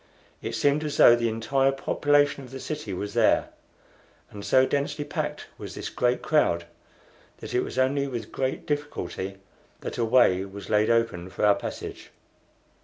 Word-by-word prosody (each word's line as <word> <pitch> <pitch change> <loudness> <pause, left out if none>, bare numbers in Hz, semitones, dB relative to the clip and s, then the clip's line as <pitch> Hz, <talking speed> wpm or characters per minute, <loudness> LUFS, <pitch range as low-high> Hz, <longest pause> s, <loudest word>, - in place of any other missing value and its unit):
It - - -4
seemed 145 +2 +2
as 150 -1 -3
though 120 - +8
the 120 -1 0
entire 135 +5 +1
population 145 +1 +1
of 125 - -11
the 135 +1 -8
city 150 -7 -5
was 100 +2 -4
there, - - +3 0.8
and 100 -1 -9
so 130 +4 +4
densely 145 +2 -1
packed 150 0 -4
was - - -7
this - - -5
great 125 0 0
crowd 85 - +2 0.7
that - - -8
it 125 - +3
was - - -6
only 140 +2 +2
with 120 -4 -5
great 130 0 -2
difficulty 100 -10 -4 0.4
that - - -5
a - - +2
way 110 -6 +4
was 100 +2 -9
laid 105 0 +3
open 115 -6 +1
for 100 - -1
our 105 - +6
passage. - - -7
130 Hz, 170 wpm, -26 LUFS, 105-145 Hz, 0.8 s, though